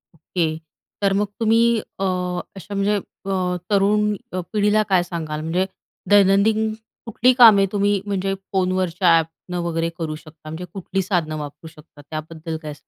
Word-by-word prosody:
Okay, 160 -1 -2 0.4
तर 200 -1 +3
मग 205 +1 +1
तुम्ही 225 0 +4 0.2
अ, 195 - -8 0.5
अशा 195 +2 -9
म्हणजे 200 +1 +1
अ, 185 -2 -3
तरुण 210 +1 +3 0.2
अ, 185 - -1
पिढीला 210 0 +3
काय 185 -2 +4
सांगाल? 160 -3 -4
म्हणजे 170 +4 0 0.4
दैनंदिन 205 +2 +4 0.3
कुठली 240 +3 +3
कामे 225 -6 +8
तुम्ही 205 0 +2
म्हणजे 195 -1 -1 0.2
फोनवरच्या 185 -2 +2
ॲपनं 165 +2 -4
वगैरे 165 -1 -1
करू 160 -3 -3
शकता? 155 +1 -14
म्हणजे 160 +3 -6
कुठली 195 0 -2
साधनं 175 -5 -1
वापरू 150 +2 -8
शकता 150 -1 -16
त्याबद्दल 160 +1 -5
काय 150 -1 -5
185 Hz, 145 wpm, -22 LUFS, 165-205 Hz, 0.5 s, कामे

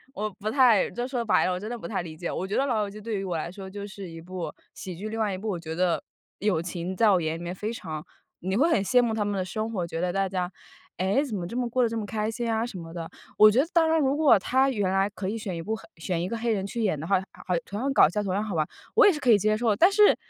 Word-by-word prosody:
我 215 -1 -2
不 215 +1 -2
太 245 -5 +5
就 240 +1 -3
说 250 -3 -2
白 220 - +3
了， 185 - +1
我 180 - -3
真 210 - -5
的 240 - -4
不 - - -7
太 200 -5 -2
理 160 -2 -9
解。 170 +2 -4
我 185 - -3
觉 195 - -2
得 - - +3
《老 235 -5 +1
友 205 - -3
记》 210 - -10
对 220 -1 -2
于 195 - -3
我 180 -3 -2
来 160 +2 -3
说 190 +1 -9
就 200 +1 -6
是 195 -2 -8
一 165 0 -9
部 180 +1 -5 0.2
喜 185 -2 -7
剧。 205 +5 -5
另 225 +1 -4
外 215 -2 +1
一 - - -5
部 215 +3 -5
我 190 -4 -1
觉 160 -1 -5
得 175 0 +1 0.4
友 200 -5 +1
情， 175 +1 -4
在 220 +2 +5
我 185 -3 +4
眼 160 0 -2
里 - - -8
面 175 +1 -4
非 210 +4 -4
常 155 -8 -6 0.4
你 190 +3 -1
会 315 +7 +4
很 230 -12 +3
羡 245 +5 +4
慕 235 -2 +1
他 215 -1 0
们 205 -1 -1
的 185 - -1
生 215 +5 -3
活， 185 -6 -2
觉 165 -1 -4
得 180 0 0
大 195 +1 +1
家， 180 -1 -2 0.5
哎， 190 +9 +2
怎 255 -8 -3
么 175 -3 -3
这 185 - -7
么 245 -1 0
过 250 +2 +1
得 235 - +3
这 225 0 -3
么 210 - -3
开 215 0 -2
心 235 +1 -3
啊 225 0 +1
什 235 -6 -6
么 165 -1 -9
的。 165 -2 -6 0.3
我 215 0 +8
觉 230 +5 +3
得 290 - +1
当 335 -2 +5
然 320 0 +3
如 275 -1 +2
果 290 -8 +6
它 265 +7 +2
原 205 -7 0
来 195 +1 +2
可 195 -2 -5
以 215 - -2
选 210 -5 -4
一 165 - -4
部 220 +5 -2
黑 - - -13
选 170 +1 -2
一 180 - -2
个 230 - -3
黑 235 +1 -1
人 195 -2 -1
去 230 +3 -3
演 190 -8 +1
的 155 - -5
话， 195 - +3 0.2
啊 180 - -4
同 200 - -5
样 275 +2 0
搞 270 - +7
笑， 205 +6 -2
同 195 -2 -2
样 205 - 0
好 215 -3 -4
玩， 155 -2 +1 0.3
我 - - +7
也 405 - +7
是 300 - -5
可 255 - +3
以 215 - +7
接 215 +2 +2
受 230 0 +1
的。 205 - +2
但 355 - +5
是 420 +1 +6
205 Hz, 355 characters per minute, -26 LUFS, 180-230 Hz, 0.5 s, 我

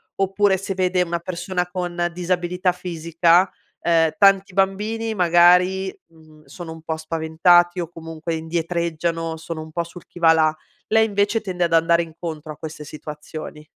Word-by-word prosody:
oppure 195 0 +2
se 195 +1 -4
vede 185 -1 +1
una 170 -1 -1
persona 180 +1 -3
con 175 -1 -2
disabilità 180 +1 0
fisica 170 0 +2 0.3
ehm, 165 -2 +3
tanti 195 -1 +4
bambini 210 +4 0
magari, 180 +1 +4
mhmm, 155 -2 -20
sono 170 -3 -9
un 160 - -12
po' 160 0 -3
spaventati 165 +3 +3
o 170 - -2
comunque 165 0 -6
indietreggiano, 165 0 -2
sono 160 0 -6
un 155 0 -10
po' 170 +2 -2
sul 170 +1 -13
chi - - -13
va 165 -1 +6
là, 155 -1 +3 0.3
lei 220 0 +4
invece 205 +1 +1
tende 185 -4 -3
ad 170 - 0
andare 165 +1 +4
incontro 160 -2 -7
a 150 - -10
queste 155 -1 -8
situazioni. 150 0 -9
170 Hz, 155 wpm, -22 LUFS, 160-185 Hz, 0.3 s, va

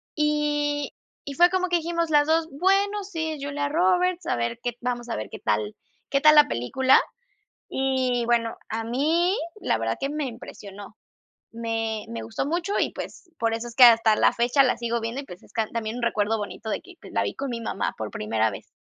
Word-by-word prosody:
y 295 -1 0 0.3
y 280 - -6
fue 350 +3 +6
como 370 0 +1
que 350 - +2
dijimos 335 0 -1
las 295 -1 +4
2: 320 0 +2
"Bueno, 395 +6 +1
sí, 320 -5 -4
Julia 285 0 -2
Roberts, 360 +2 +2
a - - 0
ver 120 - -2
qué 245 - 0
vamos 240 -1 -3
a - - -2
ver 110 - -5
qué - - -6
tal 105 -1 -1 0.3
qué 275 - +2
tal 305 0 +8
la 295 -1 +7
película". 260 - +3 0.7
Y 260 -2 0
bueno, 230 -1 +1
a 225 +1 -3
mí, 315 - +1 0.3
la - - +1
verdad 115 0 -1
que 275 - -2
me 300 0 -2
impresionó. 205 -3 -10 0.5
Me 225 -1 -3
me 115 -1 -5
gustó 115 - -3
mucho 345 +5 -1
y - - +1
pues, 365 - -8
por 230 -1 +1
eso 230 +1 -3
es 235 - -10
que 255 - +7
hasta 230 -2 +7
la - - +3
fecha 245 +4 +3
la 255 - +2
sigo 235 0 -1
viendo 230 +5 -3
y - - -12
pues 180 -8 -12
es - - -20
can 220 -2 -1
también 230 0 -3
un - - -5
recuerdo 220 -1 +1
bonito 215 +2 -6
de - - -2
que 365 -1 -15
pues - - -12
la - - +1
vi - - -3
con 275 -1 -4
mi 230 -1 -4
mamá 215 - -2
por 110 -1 -4
primera 110 +1 0
vez. - - -11
250 Hz, 215 wpm, -25 LUFS, 225-305 Hz, 0.7 s, tal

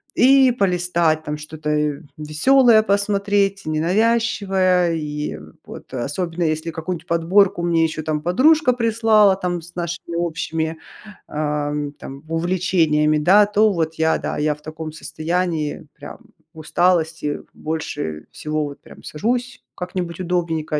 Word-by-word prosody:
и 265 0 +6
полистать 175 -6 +1
там 150 -1 -4
что-то, 150 0 -6
э, 150 -1 0 0.2
веселое 220 - +4
посмотреть, 200 -1 +1
ненавязчивое. 185 0 +1
И, 150 -1 -4
э, - - -9 0.3
вот. - - -11
Особенно, 165 +7 -3
если 160 +1 -1
какую-нибудь 165 +1 -5
подборку 175 +2 +2
мне 170 -1 +2
еще 155 0 -3
там 150 -1 -2
подружка 260 - +4
прислала, 220 -4 +3
там, 180 -2 -3
с 175 +1 -14
нашими 170 -1 -5
общими, 165 -1 -2 0.5
ам, 150 -1 -2
там, 135 +3 -9
увлечениями, 165 -3 +1
да. 195 +7 +6
То 210 +1 +3
вот 160 -3 -2
я, 160 0 +2
да, - - -4
я 150 0 +1
в 150 - -22
таком 155 0 -7
состоянии, 160 -1 -3
прям - - -10 0.4
в 160 - -12
усталости, 160 -2 0
больше 145 - -5
всего, 155 0 -3
вот, 140 -1 -9
прям - - -15
сажусь 240 - -3
как-нибудь 180 -1 -5
удобненько 165 -4 -1
170 Hz, 135 wpm, -20 LUFS, 155-195 Hz, 0.5 s, и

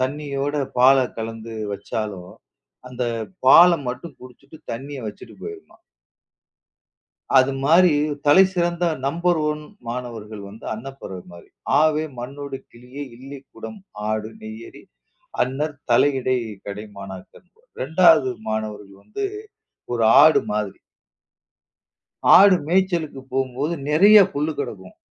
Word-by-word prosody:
தண்ணியோட 140 +1 -2 0.2
பாலை 130 +1 +5
கலந்து 115 0 -6 0.2
வச்சாலும், 100 -2 -5 0.6
அந்த 125 0 -5 0.4
பாலை 170 +5 +8
மட்டும் 130 +4 -7
குடிச்சிட்டு 135 +4 -15
தண்ணியை 135 +3 -7
வச்சிட்டு 105 - -11
போயிருமாம். 390 -5 -10 1.5
அது 130 +1 +5
மாரி 170 +5 +5 0.4
தலைசிறந்த 175 +1 +3 0.2
நம்பர் 170 +3 +1
ஒன் 150 0 -3 0.3
மாணவர்கள் 115 -4 -6
வந்து 110 +3 -13
அன்னப்பறவை 110 -7 -9
மாரி. 85 - -14 0.3
"ஆவே, 155 0 +2
மண்ணோடு 140 +2 -6
கிளியே, 125 +4 -10
இல்லிக்குடம், 135 - -11 0.3
ஆடு, 110 0 -2
நெய்யறி, 110 +1 -10 0.6
அன்னர், 145 +4 -2 0.2
தலை 145 - +5
இடை, 130 0 0 0.3
கடை 100 +1 -6
மாணாக்கர்" 95 - -11 0.3
2வது 160 -2 +4 0.2
மாணவர்கள் 105 -2 -5
வந்து 400 - -5 0.7
ஒரு 115 - 0 0.2
ஆடு 155 - +6
மாதிரி. 105 -2 -3 1.6
ஆடு 195 -1 +7
மேய்ச்சலுக்கு 170 -5 0
போகும்போது 135 +5 -1
நிறைய 195 +8 +6 0.2
புல் 150 +2 -1
கடக்கும். 95 -3 -6
135 Hz, 105 wpm, -22 LUFS, 110-155 Hz, 1.6 s, பாலை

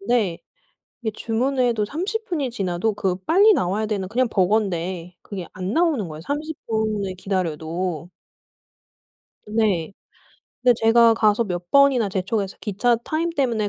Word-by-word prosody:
근데 200 -5 0 0.6
이게 220 - -1
주문을 250 +5 -1
해도 230 -3 +1
30 380 - -3
분이 295 - -2
지나도 195 -1 -1
그 190 -3 -1
빨리 405 +6 +6
나와야 205 - 0
되는 200 -3 -2
그냥 250 +5 +1
버거인데 185 -3 0
그게 190 -4 -7
안 185 +2 -4
나오는 315 - +1
거예요, 155 0 -8
30 300 - -4
분을 215 -3 -1
기다려도. 175 -2 -3 1.4
네. 210 -6 0 0.7
근데 250 -1 +5
제가 230 0 +5
가서 215 0 +3
몇 175 -3 -5
번이나 275 -6 +5
재촉해서 195 +1 -2
기차 230 +4 +1
타임 330 +2 -1
때문에 240 -9 0
215 Hz, 285 characters per minute, -22 LUFS, 185-245 Hz, 1.4 s, 빨리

